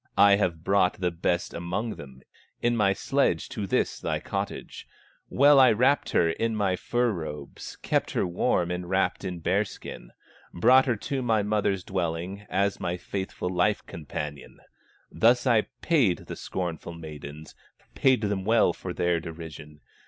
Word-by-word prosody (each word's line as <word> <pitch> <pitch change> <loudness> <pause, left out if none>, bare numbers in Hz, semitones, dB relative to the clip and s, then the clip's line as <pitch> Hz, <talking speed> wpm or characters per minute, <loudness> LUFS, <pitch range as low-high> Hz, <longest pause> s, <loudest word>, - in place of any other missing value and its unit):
I 100 0 +7
have 85 -5 -1
brought 95 -1 +2
the 90 -1 0
best 85 +1 -1
among 90 +7 -3
them 65 -7 -11 0.4
In 120 0 +1
my 105 -3 +3
sledge 100 - 0
to 100 -2 -4
this - - 0
thy - - -2
cottage; - - -5 0.4
Well 140 +1 +6
I 130 -2 +7
wrapped 130 +6 +2
her 85 -1 +3
in 115 +6 -1
my 100 -3 +1
fur 120 +5 0
robes, 75 -6 -7
Kept - - 0
her - - +1
warm 85 0 0
enwrapped 90 +3 -1
in 90 -3 -5
bear 95 +5 +2
skin, - - -10 0.5
Brought 130 +9 +5
her 120 - +2
to 135 +5 -3
my 110 -4 +1
mother's 100 -3 0
dwelling, 95 +2 -3
As 100 +2 0
my 90 -1 -2
faithful 95 -1 -4
life 90 +3 +1
companion; 75 -4 -7 0.5
Thus 120 +2 +3
I 115 -4 +3 0.2
paid 130 - +2
the - - -6
scornful 85 -2 -5
maidens, 75 -2 -9 0.4
Paid 130 -4 +3
them 100 -3 -1
well 115 +4 +3
for - - -6
their 85 -1 +1
derision. 80 -3 -9
95 Hz, 155 wpm, -27 LUFS, 85-110 Hz, 0.5 s, I